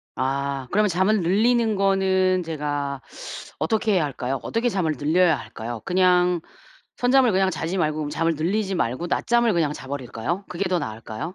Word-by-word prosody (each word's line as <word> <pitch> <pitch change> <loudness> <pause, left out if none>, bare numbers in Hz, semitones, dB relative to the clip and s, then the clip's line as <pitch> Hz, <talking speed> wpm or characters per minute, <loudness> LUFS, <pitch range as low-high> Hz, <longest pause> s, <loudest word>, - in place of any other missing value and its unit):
아 135 +1 -2
그러면 210 +1 +3
잠을 190 +3 +2
늘리는 220 +5 +2
거는 190 -1 +2
제가 145 -4 -3 0.6
어떻게 220 -1 +1
해야 175 -4 +2
할까요? 135 -1 -3
어떻게 235 +2 0
잠을 185 -8 0
늘려야 160 +2 +3
할까요? 115 0 -7
그냥 180 -1 +3 0.6
선잠을 250 -1 +4
그냥 190 0 +3
자지 175 +2 -3
말고 155 -3 +1
그러면 150 -1 -3
잠을 165 +2 0
늘리지 190 +6 -1
말고 130 0 -1
낮잠을 235 +5 +2
그냥 160 -4 +1
자버릴까요? 135 - -4
그게 180 +2 -2
더 180 -1 +1
나을까요? 110 +6 -6
175 Hz, 370 characters per minute, -23 LUFS, 145-195 Hz, 0.6 s, 선잠을